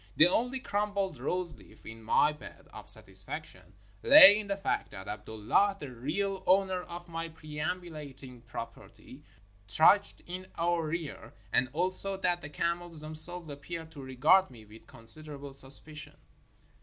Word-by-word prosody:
The 155 - +7
only 245 +8 0
crumpled 205 -4 -2
roseleaf 165 - -5
in 110 +1 -10
my 145 +7 +2
bed 150 - -13
of - - -9
satisfaction - - -1 0.3
lay 280 -8 +9
in 210 - -6
the 200 0 -2
fact 200 - -2
that 95 -1 -10
Abdullah, 110 - 0
the 140 -6 -8
real 185 +11 -3
owner 190 0 +2
of 175 0 -10
my 165 0 -5
perambulating 150 -5 -7
property, 115 - -10 0.5
trudged 160 - +3
in 185 +1 -8
our 170 -1 0
rear, 160 -5 -6 0.2
and 125 - +2
also 185 +5 -1
that 175 -2 -1
the 145 - -8
camels 170 +1 -2
themselves 155 +3 +4
appeared 160 +3 -8
to 145 -3 -10
regard 150 +9 +3
me 115 -4 -15
with 110 +2 -16
considerable 140 +4 -1
suspicion. 145 +2 -5
160 Hz, 140 wpm, -30 LUFS, 140-185 Hz, 0.5 s, lay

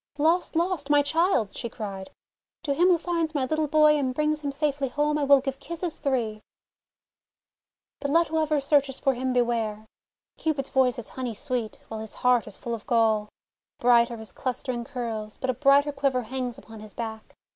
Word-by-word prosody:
"Lost! 325 +4 +2
Lost! 340 -3 0
My 290 0 +5
child!" 320 - +1
she 235 - -4
cried. 195 -4 -6 0.5
"To 290 -4 0
him 350 +6 +3
who 360 -2 +5
finds 330 -2 -2
my 270 -3 +1
little 310 +3 0
boy 300 0 +5
and 260 -2 -1
brings 300 +1 0
him 285 -1 -2
safely 280 -1 -1
home, 295 +3 0
I - - 0
will 280 -1 +6
give 270 0 -4
kisses 340 +2 -5
three! 235 -7 -1 1.6
"But 280 - -3
let 330 +2 +3
whoever 310 -1 +1
searches 280 -1 +1
for 270 - +2
him 255 +1 -2
beware! 230 -3 0 0.5
Cupid's 295 -4 -1
voice 260 -2 +2
is 240 - -6
honey 250 -4 -5
sweet, 240 -1 -3
while 220 - -5
his 220 -1 -7
heart 250 -2 +2
is - - -10
full 235 - -5
of 225 -2 -6
gall! 220 -3 +2 0.5
Bright 240 -1 +5
are 235 - -6
his 220 -1 -9
clustering 250 -2 -3
curls, 230 -5 -5
but 260 - -1
a - - -5
brighter 280 +3 +4
quiver 275 -3 0
hangs 250 +1 -4
upon 225 -5 -12
his 215 -1 -11
back. 220 -2 -6
265 Hz, 190 wpm, -26 LUFS, 235-300 Hz, 1.6 s, will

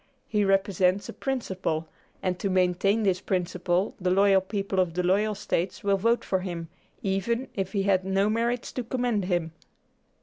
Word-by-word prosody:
He 210 -1 +1
represents 195 -1 +2
a - - -5
principle, 185 - -2 0.4
and 180 -1 -1
to 200 - -1
maintain 185 +3 +2
this 190 -2 +1
principle 180 0 0
the 180 - +1
loyal 195 +1 +5
people 195 0 -2
of 175 -3 +1
the 180 - 0
loyal 205 +4 +2
States 185 -2 -2
will 200 -1 +3
vote 230 +5 +1
for 190 - +1
him, 170 -3 -5 0.3
even 220 +6 -1
if 190 -1 -3
he 200 -2 +1
had 190 -2 +2
no 195 +1 +1
merits 235 +2 0
to 250 - -3
commend 240 -4 -1
him." 175 -3 -1
195 Hz, 170 wpm, -27 LUFS, 180-210 Hz, 0.4 s, loyal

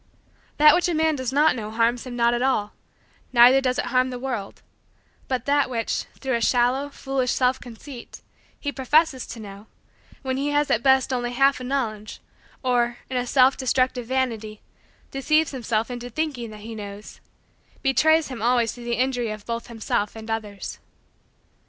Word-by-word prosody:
That 300 0 +8
which 355 0 +2
a 340 - 0
man 315 0 +2
does 260 -2 -3
not 295 +1 +4
know 215 -3 -5
harms 230 +3 0
him 245 - -6
not 235 0 +3
at 240 - -1
all, 215 -6 0 0.6
neither 250 +2 +7
does 255 -1 0
it - - -1
harm 255 0 +2
the 250 - -5
world; 245 -6 -5 0.6
but 255 -2 -2
that 285 -1 +2
which, 230 -3 -2
through 265 -1 -2
a 235 - 0
shallow, 250 +4 +2
foolish, 270 -2 -2
self 255 0 +1
conceit, 245 +1 -11 0.4
he 285 - -3
professes 275 0 +2
to 235 - -8
know, 205 0 -10 0.6
when 260 -1 -2
he 280 +2 -1
has 290 0 +1
at 220 - +2
best 265 0 +3
only 245 -1 -1
a - - -7
half 275 0 +3
knowledge, 235 -5 -3 0.4
or, 240 -1 +1
in 255 - -1
a 250 0 -1
self 260 +1 +5
destructive 255 -2 0
vanity, 230 -5 -2 0.5
deceives 305 +3 +1
himself 235 -3 -2
into 245 0 -6
thinking 260 -3 -3
that 215 -1 -11
he 225 +2 -8
knows, 205 -1 -9 0.6
betrays 315 +3 +3
him 250 -4 -7
always 235 -1 +2
to 240 - -11
the 235 0 -1
injury 250 -1 0
of 215 -1 -7
both 230 0 -4
himself 220 -2 -2
and 220 0 -7
others. 210 -3 -5
250 Hz, 175 wpm, -24 LUFS, 230-270 Hz, 0.6 s, That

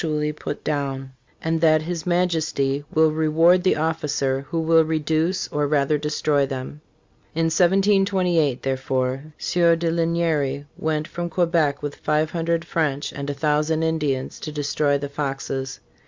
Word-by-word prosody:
ually 150 -2 -1
put 145 - -6
down, 135 -3 -3 0.3
and 160 0 0
that 155 -1 +4
his 170 -1 -4
Majesty 160 -6 0
will 160 0 +4
reward 160 +3 +3
the 185 - +3
officer 140 -4 -1
who 165 0 -1
will 160 0 +4
reduce, 160 +3 0
or 150 0 0
rather 145 0 +2
destroy, 150 -1 +1
them."* 135 +2 -6 0.5
In 165 0 +1
1728, 185 -5 +2
therefore, 130 0 -1
Sieur 170 -1 +3
de 165 0 -1
Lignery 165 -4 0
went 155 0 -2
from 175 0 -4
Quebec 165 -5 +1
with 145 -1 -4
five 155 +1 0
hundred 170 0 -1
French 150 -4 -1
and 140 0 -5
a 145 - -3
thousand 150 +2 +1
Indians 150 -5 -1
to 155 - -6
destroy 145 -1 0
the 140 0 -4
Foxes. 135 -2 -4
155 Hz, 145 wpm, -23 LUFS, 140-165 Hz, 0.5 s, that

